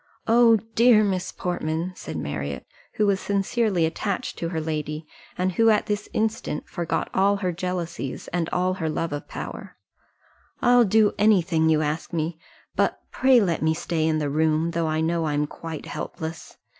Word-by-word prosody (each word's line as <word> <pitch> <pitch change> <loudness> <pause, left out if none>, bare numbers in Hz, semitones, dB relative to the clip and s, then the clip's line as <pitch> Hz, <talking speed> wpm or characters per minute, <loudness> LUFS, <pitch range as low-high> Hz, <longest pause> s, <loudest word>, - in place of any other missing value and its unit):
"Oh, 230 0 +6 0.2
dear 230 -2 +6
Miss 190 -3 -1
Portman," 170 0 -2
said - - -6
Marriott, 70 -2 -4 0.3
who 215 - +1
was 200 -2 +2
sincerely 200 -2 +1
attached 200 +8 -3
to 165 - -2
her 165 -2 -2
lady, 155 0 -3 0.3
and 185 +1 +1
who 225 +5 +4
at 215 -1 +3
this 210 0 -3
instant 215 -8 -2
forgot 170 -1 -2
all 200 +1 +3
her 190 -3 -1
jealousies, 175 -5 -4
and 170 -1 -1
all 185 +1 +1
her 165 -4 -2
love 165 +1 -2
of 145 - -5
power, - - -7 0.8
"I'll 245 -1 +5
do 215 +1 +4
any 210 -4 +5
thing 160 -2 +1
you 155 -1 +3
ask 155 +3 -3
me; 160 0 -2 0.4
but - - +1
pray 260 -1 +5
let 180 -7 0
me 160 +1 +2
stay 160 -1 -1
in 160 -1 +2
the 145 -2 -1
room, 160 +2 +1
though 165 -1 -1
I 155 0 0
know 165 0 0
I'm 150 0 +1
quite 160 +1 -7
helpless. 160 0 -6
170 Hz, 175 wpm, -24 LUFS, 160-200 Hz, 0.8 s, Oh